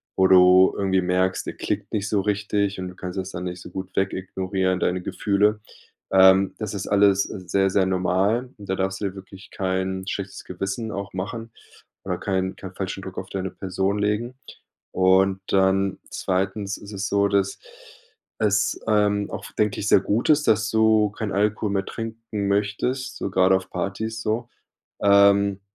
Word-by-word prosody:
wo 95 - +4
du 90 0 +6
irgendwie 95 -1 +1
merkst, 90 +1 0
der - - -3
klickt - - -3
nicht 100 -1 -2
so 105 -2 +1
richtig 100 -1 -1
und 90 - -4
du 90 - -10
kannst 90 0 -7
das 95 0 -4
dann 90 +1 -5
nicht 90 0 -5
so - - -11
gut 95 -1 -7
weg 95 0 +1
ignorieren, 95 0 -2
deine 90 +1 0
Gefühle. 105 +3 +1 0.5
Ähm, 95 0 +6
das 105 -2 -4
ist 95 - -4
alles 100 -1 +4
sehr, 95 0 -1
sehr 95 0 +3
normal. 95 +6 +1
Da 100 -2 -3
darfst 95 +1 -2
du - - -1
dir 95 -1 -3
wirklich 95 0 -12
kein 95 0 -2
schlechtes 100 0 -5
Gewissen 95 +5 -4
auch 100 -1 -5
machen 110 +5 -5 0.5
oder - - -2
keinen 95 -1 -1
keinen 95 -1 -10
falschen 95 0 -4
Druck 95 -1 -9
auf - - -5
deine 95 -1 -3
Person 95 +2 -2
legen. 105 +4 -1 0.6
Und 95 +1 +3
dann 95 0 +2
zweitens 100 +2 -2
ist 100 - -11
es 100 0 -3
so, 100 0 +2
dass 100 -1 0 0.8
es, 100 -2 +1
ähm, 105 -1 +2
auch, - - -6
denke 105 -2 0
ich, 105 - -2
sehr 95 - +5
gut 105 +4 0
ist, 150 -1 +4
dass 110 +1 +2
du 110 -2 +3
keinen 105 -1 -4
Alkohol 105 +1 0
mehr 100 -1 -1
trinken 115 -2 -5
möchtest, 105 +6 -1
so - - -3
gerade 95 0 +4
auf 95 0 -3
Partys, 110 +5 -4
so, 115 +2 -2 0.5
ähm, 100 0 +4
100 Hz, 175 wpm, -23 LUFS, 95-105 Hz, 0.8 s, du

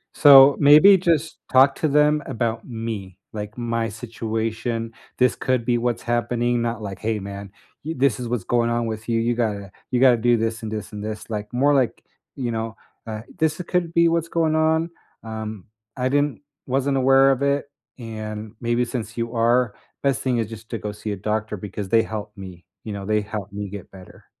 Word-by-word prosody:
so, 140 -1 +9
maybe 155 +7 +8
just 165 -3 0
talk 135 +1 +6
to 155 - 0
them 150 +1 +3
about 115 0 -2
me, 110 -6 -5 0.2
like 105 0 -6
my 115 -2 -1
situation. 115 +1 -3 0.3
This 125 -1 +3
could 130 -3 -1
be 120 -1 +2
what's 120 0 -1
happening, 120 0 0
not 115 -1 -2
like, 95 -2 -6
"Hey 110 -1 -1
man, 100 0 -8 0.3
y 160 - -2
this 130 -4 +2
is 125 - -4
what's 120 -5 -2
going 120 -1 +1
on 120 0 0
with 110 +1 -5
you, 115 - +2
you 115 +1 +1
gotta 105 -5 -2 0.2
you 125 - +1
gotta 125 -3 +6
do 120 +1 +3
this 115 0 -2
and 110 - -4
this 110 -1 -5
and 105 0 -6
this." 110 +1 -6
Like, 105 +1 -4
more 140 +4 +3
like, 130 -4 0 0.3
you 125 -3 -3
know, 115 0 -3 0.3
uh, 110 -1 -5 0.2
"This 155 +1 +1
could 180 -2 0
be 170 0 +5
what's 170 0 0
going 165 -2 +1
on, 160 +1 +2 0.3
um, 110 -3 -6 0.3
I 130 0 0
didn't 145 +1 0 0.3
wasn't 135 +1 +1
aware 135 +1 +5
of 135 - -1
it, 140 0 +1 0.3
and 110 -2 -6
maybe 120 +1 +1
since 115 -2 -5
you 115 0 -3
are, 120 0 +2 0.3
best 140 -4 +1
thing 125 -2 0
is 115 - -1
just 110 0 -10
to 115 - -2
go 105 - -4
see 105 +1 -5
a - - -6
doctor 105 +2 -2
because 100 0 -6
they 115 +1 +4
help 105 -1 -6
me." 95 -2 -10 0.2
You 110 - -4
know, 100 -1 -6
they 105 0 +2
help 105 -1 -6
me 105 0 -4
get 100 -1 -9
better." 95 -2 -15
115 Hz, 200 wpm, -23 LUFS, 110-130 Hz, 0.3 s, so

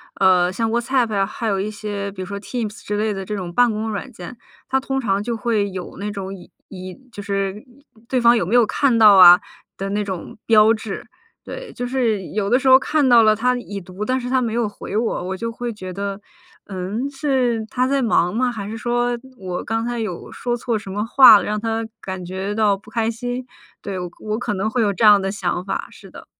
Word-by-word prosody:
呃， 180 -2 +4
像 225 +4 -1
WhatsApp 240 0 0
啊， 195 -1 +2
还 225 +3 -5
有 200 -2 +1
一 200 +3 -2
些 205 -1 -5
比 190 -1 -8
如 - - -4
说 200 +2 -6
Teams 215 +1 -5
之 205 - -2
类 215 0 0
的 195 -1 -5
这 200 - -6
种 180 -4 -5
办 245 +3 +4
公 215 +1 -3
软 215 +5 -5
件， 220 +2 -10 0.3
它 265 0 +1
通 270 0 -2
常 200 -5 0
就 235 +1 -3
会 215 -2 0
有 185 -2 -7
那 205 +2 -4
种 195 -1 -6
已 180 - -15 0.2
已 185 -1 -9 0.2
就 205 - -7
是 200 0 -3 0.5
对 255 - +1
方 235 0 +5
有 210 - 0
没 205 +8 0
有 240 -2 +6
看 255 +2 +1
到 210 -2 +8
啊 180 -1 +9 0.4
的 195 - -4
那 210 +1 0
种 190 -4 -6
标 220 0 +6
志。 215 -3 -6 0.4
对， - - -8
就 245 - -4
是 240 -5 0
有 205 -2 -1
的 245 +3 +4
时 270 - -2
候 260 0 +9
看 285 +1 +1
到 240 -2 +7
了 215 -1 +5
他 250 +4 +1
已 205 -5 -6
读， 185 +2 -7
但 255 +4 0
是 245 0 -5
他 260 0 +2
没 230 -3 -2
有 235 -1 0
回 205 0 -6
我， 225 -5 -1
我 190 - -3
就 230 +4 -3
会 240 +1 -5
觉 185 -4 -8
得：” 200 +1 -4 0.5
嗯？ 200 +7 -4
是 260 -5 0
他 255 +1 0
在 275 0 +1
忙 195 -6 +2
吗？ 250 +1 +1
还 205 -4 -6
是 225 - -5
说 240 +1 0 0.2
我 185 -3 -5
刚 225 +1 -2
才 240 0 -3
有 215 -7 -5
说 240 -1 -3
错 235 -1 -1
什 205 -2 -8
么 205 +2 -2
话 235 -2 +8
了， - - -2
让 210 - -1
他 225 0 -2 0.2
感 190 -1 -6
觉 190 +3 -4
到 210 -2 +2
不 205 +2 -16
开 225 -1 0
心？ 245 +2 -4 0.3
“对， 200 - -5 0.2
我 215 0 -3
可 230 -2 -3
能 195 +3 -1
会 240 +2 0
有 210 -2 +2
这 220 +3 +1
样 205 -1 +7
的 195 0 -2
想 180 -3 -2
法， 195 +1 -4
是 - - -15
的。 - - -12
215 Hz, 275 characters per minute, -21 LUFS, 195-240 Hz, 0.5 s, 啊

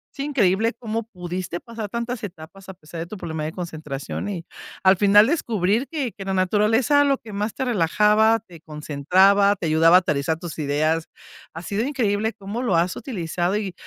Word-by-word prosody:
Es - - -20
increíble 230 -6 +1
cómo 225 -1 -3
pudiste 180 -4 -6
pasar 230 -3 -7
tantas 235 +1 -4
etapas 190 +1 -10
a 190 - -8
pesar 165 -1 -10
de 170 - -5
tu 210 - -8
problema 160 -4 -4
de 155 - -3
concentración 155 -1 -6
y 175 -5 -5 0.4
al 190 0 +6
final 205 +2 +6
descubrir 230 - 0
que 285 -8 -3
que 195 - -9
la 195 0 -2
naturaleza 220 +9 +3
lo 280 -1 +2
que 215 -4 -12
más 210 +2 -3
te 265 - -2
relajaba, 215 +2 +3
te 175 -7 -16
concentraba, 180 +7 +3
te 180 - -5
ayudaba 165 +2 +5
a - - +9
aterrizar 150 -1 -1
tus 165 -2 -8
ideas. 155 +3 0 0.5
Ha 165 - -7
sido 205 +5 -2
increíble 220 -6 0
cómo 210 +3 -6
lo 220 -9 +1
has 170 +2 +1
utilizado 185 - -2
y 195 -4 -4
195 Hz, 185 wpm, -23 LUFS, 170-225 Hz, 0.5 s, a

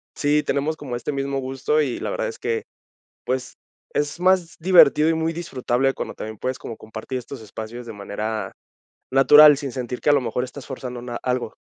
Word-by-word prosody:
sí, 150 +1 +2
tenemos 150 +3 -1
como 130 -6 -5
este 120 +5 -3
mismo 135 0 -2
gusto, 135 +4 0
y 130 -5 -2
la - - -3
verdad - - -2
es 455 - -9
que, 455 -1 -1 0.6
pues, 130 0 -2 0.4
es 145 +3 -1
más 180 -2 +2
divertido 165 -3 +6
y - - +3
muy 160 0 0
disfrutable 135 -5 0
cuando - - -5
también 110 0 -7
puedes 130 0 -3
como 115 - -7
compartir 110 +4 -6
estos 125 0 -8
espacios 110 +3 -8
de 115 - -6
manera 105 +2 -4 0.6
natural, 150 +2 +8
sin 140 -2 -4
sentir 125 -1 -5
que - - +2
a - - +7
lo 145 - +4
mejor 125 0 -2
estás 130 +1 -8
forzando 125 -2 -6
na 120 -1 -5
algo. 125 -1 -2
135 Hz, 195 wpm, -23 LUFS, 120-150 Hz, 0.6 s, natural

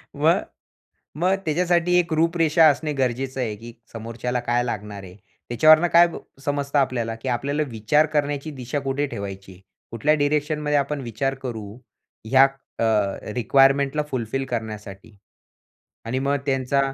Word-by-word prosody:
मग, - - +3 0.8
मग 180 +4 +2
त्याच्यासाठी 175 +2 +1
एक 175 -1 0
रूपरेषा 165 0 +3
असणे 150 +1 0
गरजेचं 130 0 -2
आहे 115 -4 -2
की 115 +2 -11 0.2
समोरच्याला 115 +2 -4
काय 120 0 0
लागणार 105 -4 -5
आहे. 90 -1 -12 0.3
त्याच्यावरून 155 +7 +5
काय 170 +1 +7 0.4
समजतं 145 0 -1
आपल्याला 120 -4 0
की 130 - -3
आपल्याला 140 +5 -1
विचार 115 +8 +2
करण्याची 145 0 -1
दिशा 130 0 -4
कुठे 135 +1 -1
ठेवायची. 95 -5 -8 0.3
कुठल्या 130 +7 +1
डायरेक्शनमध्ये 150 0 0
आपण 140 +1 -2
विचार 135 +2 -2
करू, 115 -5 -5 0.6
ह्या 130 +4 +5 0.4
अ, 115 - +1 0.5
रिक्वायरमेंटला 135 +4 +3
फुलफिल 130 +1 -2
करण्यासाठी. 105 -3 -6 0.9
आणि 125 +3 -1
मग 140 +2 0
त्यांचा 135 0 +1
135 Hz, 130 wpm, -23 LUFS, 115-150 Hz, 0.9 s, काय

